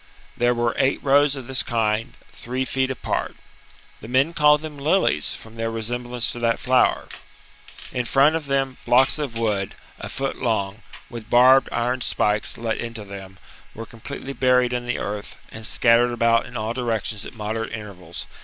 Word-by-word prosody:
There 120 0 +2
were 120 -1 0
eight 135 0 +2
rows 145 +1 +4
of 135 -3 -7
this 130 +1 0
kind, 110 0 -1 0.2
three 130 +2 -4
feet 130 0 0
apart. 130 - -3 0.6
The 110 - -10
men 135 +7 +2
called 150 -1 +5
them 155 -2 -8
lilies, 145 - +2
from 115 0 -13
their 115 0 -1
resemblance 120 +2 -2
to 120 - -6
that 115 -1 +1
flower. 130 0 +2 0.8
In 125 -1 -2
front 140 +5 +4
of 160 -3 -3
them 135 -1 0
blocks 130 +5 +4
of 140 -6 -4
wood 105 -4 -1 0.2
a - - -6
foot 135 0 -3
long, 110 -3 -1 0.3
with 115 -2 -9
barbed 130 +2 +6
iron 125 +2 -1
spikes 105 -3 0
let 115 -1 -2
into 115 -2 -5
them, 95 -1 -10 0.4
were 115 - -7
completely 135 +4 -8
buried 125 -2 +3
in 120 0 -3
the 120 - -1
earth 105 0 -5
and 110 0 -4
scattered 120 +1 +4
about 115 0 +2
in 125 -1 -7
all 110 +1 -2
directions 115 -4 -2
at - - -10
moderate 110 +1 -4
intervals. 95 -6 -8
120 Hz, 175 wpm, -23 LUFS, 110-130 Hz, 0.8 s, barbed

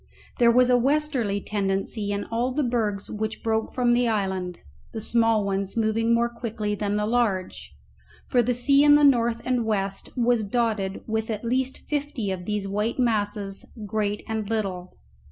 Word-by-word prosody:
There 235 -1 +6
was 250 +1 +4
a 245 - +5
westerly 265 -6 +1
tendency 200 +1 -2
in 200 0 -2
all 235 +3 -1
the 290 +3 0
bergs 220 -5 -1
which 220 +1 -4
broke 220 -1 0
from 245 -1 +1
the 240 0 +3
island, 190 -5 -2 0.3
the 225 - -4
small 225 -1 +2
ones 195 +1 -2
moving 225 +1 +1
more 235 0 +3
quickly 225 -3 -4
than 205 0 -1
the 210 0 0
large, 215 -5 -1 0.5
for 245 - +3
the 245 +1 0
sea 275 +3 +4
in 290 0 +7
the 295 - +4
north 235 -4 +3
and 250 -2 +1
west 195 -3 -2
was 240 -2 +2
dotted 210 -3 -1
with 220 0 -2
at 215 +1 -3
least 260 +2 -1
fifty 285 -8 -2
of 180 -2 -5
these 210 -1 -2
white 210 +3 -1
masses, 205 -5 0 0.2
great 210 0 -2
and 220 -2 -3
little. 190 -5 -3
220 Hz, 170 wpm, -25 LUFS, 205-240 Hz, 0.5 s, in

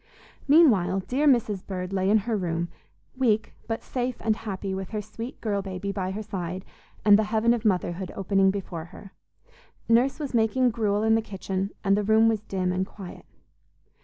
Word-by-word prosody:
Meanwhile 210 - +5
dear 260 +10 0
Mrs. 220 -8 +2
Bird 185 -1 -4
lay 190 0 +1
in 215 - +5
her 235 -2 0
room, 170 -3 -2 0.5
weak, 220 -5 +1
but 225 0 -3
safe 250 -1 -2
and 220 -1 +1
happy 200 -3 -5
with 190 0 -4
her 215 -1 -3
sweet 230 +4 -8
girl 205 -3 -1
baby 195 0 -4
by 190 -2 -3
her 205 +3 -4
side 185 -1 -5 0.4
and 205 0 +7
the 220 - +1
heaven 220 +2 +2
of 235 -2 -2
motherhood 180 -2 0
opening 195 0 +2
before 185 -4 -4
her. 190 +2 -13 0.8
Nurse 245 +4 +3
was 285 -4 -4
making 240 +2 +3
gruel 210 -2 0
in 220 0 +4
the 225 - +3
kitchen, 195 -2 -3
and 195 -1 +3
the 210 - +1
room 220 +2 +4
was 220 -2 +1
dim 185 -4 -2
and 185 +1 0
quiet. 190 -1 -10
205 Hz, 185 wpm, -26 LUFS, 190-225 Hz, 0.8 s, and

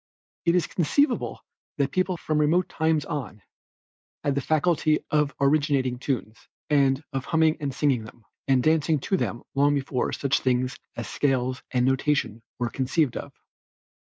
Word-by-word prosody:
It 170 0 +3
is 180 - +2
conceivable 185 - 0 0.3
that 140 -1 0
people 185 -1 0
from 155 -2 -1
remote 160 +5 +3
times 160 -2 0
on, 135 -10 -5 0.8
had 140 - +1
the 140 - -1
faculty 155 +1 +1
of 150 -1 +2
originating 140 -3 +2
tunes, 120 -5 -3 0.3
and 140 -1 +3
of 135 0 -2
humming 160 -1 +2
and 145 -3 -2
singing 130 -4 +1
them, 110 +1 -15 0.2
and 130 -2 +3
dancing 155 -1 +2
to 190 - 0
them 120 -9 -2
long 145 +1 +3
before 135 -2 -1
such 140 -1 0
things 130 0 0 0.2
as 120 -2 -5
scales 130 +1 0
and 125 -1 +1
notation 130 -4 0 0.2
were 120 -2 -2
conceived 135 +2 0
of. - - -6
140 Hz, 155 wpm, -25 LUFS, 130-155 Hz, 0.8 s, It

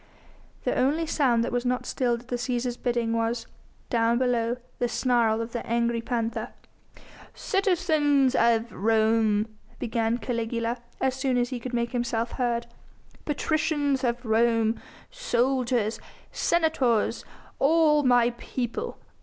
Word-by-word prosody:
The - - 0
only 300 +6 +1
sound 255 -7 +2
that 240 - -2
was 245 0 0
not 250 0 -1
stilled 240 -2 0
at 240 - -21
the 245 - -1
Cæsar's 245 0 -2
bidding 240 -2 -1
was 230 +1 -1 0.5
down 230 -1 +2
below 240 -1 +1 0.2
the 245 - +1
snarl 235 -2 +1
of 230 +1 -5
the 235 - -4
angry 235 0 0
panther. 230 -1 -3 0.8
"Citizens 315 - +2
of 230 -2 +2
Rome," 220 0 +2 0.3
began 230 -1 0
Caligula, 230 0 -2 0.2
as 265 - +1
soon 260 -1 0
as 245 0 +1
he 255 - -4
could 245 +1 -5
make 235 0 -1
himself 235 -2 -1
heard, 240 -2 -1 0.6
"patricians 295 -2 0
of 245 0 -1
Rome! 225 0 +2 0.3
soldiers! 250 - 0 0.3
senators! 315 -10 +1 0.4
all 300 0 +4
my 245 -3 +4
people! 260 - -4
240 Hz, 130 wpm, -26 LUFS, 230-265 Hz, 0.8 s, all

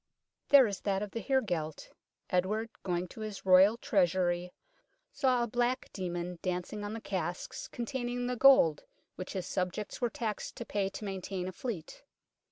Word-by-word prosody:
There 280 -2 +9
is 200 -4 -3
that 195 0 0
of 205 - -6
the 230 - -4
heregelt. 180 - -1 0.4
Edward, 210 +5 0
going 180 -1 -1
to 220 - -10
his 215 -3 -6
Royal 190 +4 +7
Treasury, 180 -7 +1 0.6
saw 255 - +2
a - - -1
black 245 +2 0
demon 175 -2 -4
dancing 185 +3 -3
on 205 +1 -4
the 225 - -4
casks 180 -4 -4
containing 245 0 -3
the 250 0 -1
gold 245 - +6 0.3
which 185 - -6
his 190 -3 -3
subjects 185 +6 -3
were 240 - +2
taxed 220 -3 -4
to - - -6
pay 200 -1 -1
to 195 +2 -7
maintain 190 -1 -4
a - - -3
fleet. 185 -4 -6
200 Hz, 165 wpm, -31 LUFS, 180-235 Hz, 0.6 s, There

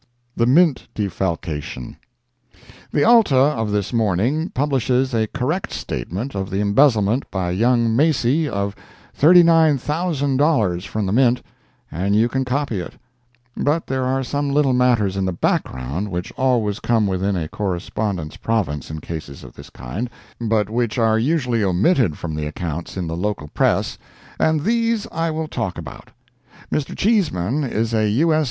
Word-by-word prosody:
THE 115 - +2
MINT 155 +2 +3
DEFALCATION 85 - -3 1.0
The 145 - +2
Alta 230 - +5
of 130 -5 +2
this 105 +2 -1
morning 115 - +1
publishes 130 -2 0
a 110 -1 +1
correct 155 - -2
statement 110 +11 -4
of 95 -1 -3
the 95 - -2
embezzlement 110 +2 +2
by 90 -3 -2
young 115 +3 +2
Macy 145 +1 +2
of 100 -2 -2 0.4
$39,000 150 - +3
from 110 0 -2
the 95 - -1
mint, 125 +2 +3 0.5
and 95 +5 0
you 110 +2 +4
can 130 +2 -1
copy 130 -5 -1
it; 90 - -7 0.6
but 155 +3 0
there 130 0 -2
are 130 +1 0
some 145 +2 -2
little 140 -2 +2
matters 120 -6 +2
in 95 - -1
the 95 - 0
background 70 +4 -2
which 90 -1 -4
always 115 -6 0
come 115 -3 +1
within 95 +1 0
a 80 -3 -2
correspondent's 95 -2 -3
province 90 - -2
in 80 0 -6
cases 75 -4 -7
of - - -12
this - - -12
kind, 100 - -5 0.3
but 110 -3 +1
which 115 +1 -1
are 110 -2 +3
usually 125 -4 +1
omitted 100 - +2
from 80 -2 -5
the 75 0 -3
accounts 85 +3 -5
in 90 - -2
the 80 0 -4
local 90 -4 -3
press, - - 0 0.4
and 155 -2 +2
these 230 0 +1
I 165 +1 -1
will 160 0 -3
talk 110 -10 -3
about. - - -9 0.6
Mr. 150 - -2
Cheeseman 155 - +1
is 115 -3 -1
U.S. 115 +10 +2
115 Hz, 150 wpm, -21 LUFS, 95-140 Hz, 1.0 s, Alta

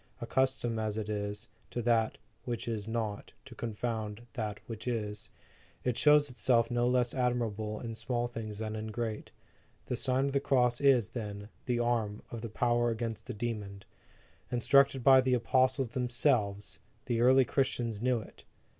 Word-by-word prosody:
Accustomed 130 -3 0
as 110 -1 -2
it 105 -1 -3
is, 105 +2 -3 0.2
to - - -8
use 120 - -2
that 115 -2 +2 0.3
which 120 -2 -4
is 110 -3 -3
not, 110 -3 -3
to - - -11
confound 110 -1 -4
that 105 -4 -3
which 115 +1 -7
is, 105 -4 -3 0.5
it 125 -2 0
shows 150 +1 +5
itself 120 -2 +2
no 120 0 +2
less 125 -1 +2
admirable 115 -4 -1
in 115 -2 -5
small 120 +1 -2
things 110 -3 -6
than 110 0 -4
in 110 0 -4
great. 110 0 -4 0.6
The 125 - -2
Sign 130 +2 +1
of 140 - 0
the 140 - +2
Cross 125 -3 +2
is, 130 -7 +4
then, 105 -3 -6 0.2
the 125 -1 +1
arm 115 -3 0
of 115 -1 -6
power 120 +1 +2
against 115 -1 -4
the 125 - -5
demon. 105 -3 -4 0.7
Instructed 135 +2 +4
by 130 0 +8
the 130 0 +2
apostles 130 +1 +2
themselves, 120 -5 0 0.3
the 120 -2 0
early 130 +1 +6
Christians 120 -5 -1
knew 125 -2 +1
it. - - -14
120 Hz, 165 wpm, -31 LUFS, 110-125 Hz, 0.7 s, by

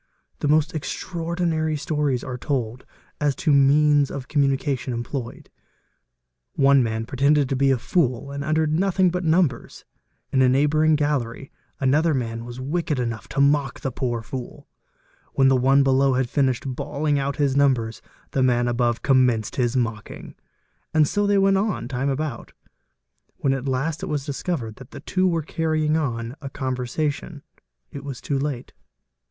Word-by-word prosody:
The - - -1
most 155 +1 +2
extraordinary 165 -1 -2
stories 150 -4 -1
are 130 - -5
told 125 -2 -3 0.3
as 145 -2 +1
to 155 -4 +1
means 145 +1 +4
of 135 -2 -6
communication 135 -3 0
employed. 120 +1 -6 1.0
One 140 -1 +4
man 110 -1 -2
pretended 140 +3 +2
to 135 - 0
be 135 +1 +2
a 135 - +3
fool 135 -1 0
and 140 0 -4
uttered 155 0 +1
nothing 185 +1 +2
but 180 +1 -2
numbers; 160 -6 0 0.5
in 135 - +2
the 130 -1 +5
neigh 135 +3 +3
bouring 155 +1 +3
gallery 140 -3 -2 0.3
another 150 +4 +2
man 115 -2 -3
was 120 +1 -8
wicked 155 +3 -2
enough 115 -2 -3
to 140 - -4
mock 140 -2 +2
the 135 - -2
poor 120 -2 -2
fool; 125 +1 -8 0.7
when 135 0 +4
the 135 - +4
one 135 +2 +4
below 135 0 +3
had 125 -2 -1
finished 130 -4 +1
bawling 145 +1 -1
out 140 0 -2
his 140 -2 +1
numbers, 130 -6 +1 0.3
the 135 - 0
ma 130 -1 +4
n 120 0 0
above 120 -1 0
commenced 125 -5 +2
his 125 0 +1
mocking. 115 -3 -4 0.6
And 155 -2 +5
so 205 +4 0
they 205 0 +3
went 195 0 +4
on 200 - -1
time 130 +2 -2
abow 140 -2 -3 0.9
When 135 - +1
at 135 0 -3
last 135 +5 -1
it - - -4
was 145 -2 -2
discovered 140 -6 -4
that 130 -1 -12
the - - -9
two 185 0 +1
were 165 -3 0
carrying 155 0 0
on 120 -6 -2
a 140 - -6
conver 130 -2 -3
sation, 150 +1 -3 0.5
it 140 - -8
was 140 -3 -6
too 140 -2 -2
late. 135 -3 -4
140 Hz, 170 wpm, -23 LUFS, 125-150 Hz, 1.0 s, the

